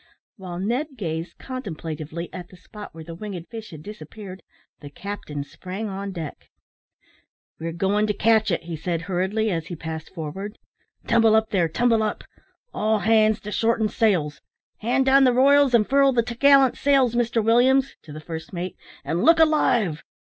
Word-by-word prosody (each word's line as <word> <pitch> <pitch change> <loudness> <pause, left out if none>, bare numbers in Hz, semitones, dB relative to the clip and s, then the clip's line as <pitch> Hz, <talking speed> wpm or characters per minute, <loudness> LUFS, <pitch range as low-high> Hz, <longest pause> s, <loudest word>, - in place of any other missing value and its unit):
While 185 -3 -7
Ned 255 - -2
gazed 165 -4 -4
contemplatively 170 - -6
at 180 -1 -7
the 185 - -15
spot 210 +3 -11
where 160 0 -10
the 165 +1 -9
winged 180 -1 -7
fish 225 -2 -8
had 155 -3 -11
disappeared, 195 0 -10 0.4
the 145 - -10
captain 150 -4 -6
sprang 190 +8 -6
on 195 0 -5
deck. 165 -6 -8 1.1
"We're 165 +1 -4
goin' 200 +5 +1
to 210 - 0
catch 220 0 +3
it," 170 -2 -1
he 170 0 -5
said, 165 +1 -3
hurriedly, 190 +4 -1
as 165 -2 -3
he 175 - -6
passed 160 0 -7
forward; 190 +6 -6 0.5
"tumble 225 -2 +4
up, 220 0 +1
there; 175 -5 +2
tumble 230 +4 +2
up; 215 -1 -2 0.5
all 215 +1 +1
hands 215 -1 +3
to 210 - -7
shorten 225 0 +1
sails. 180 -12 0 0.4
Hand 250 +4 +1
down 270 +1 +6
the 255 -2 +4
royals, 275 0 +5
and 215 -3 +3
furl 275 0 +4
the 235 -1 +2
t'gallant 265 +2 +4
sails, 270 -4 +3
Mr 235 -1 +1
Williams, 260 +4 +3
(to 155 - -13
the 155 - -8
first 160 +1 -8
mate,) 180 0 -5 0.3
and 170 +2 -1
look 330 +1 +6
alive." 250 - +2
210 Hz, 170 wpm, -23 LUFS, 170-235 Hz, 1.1 s, down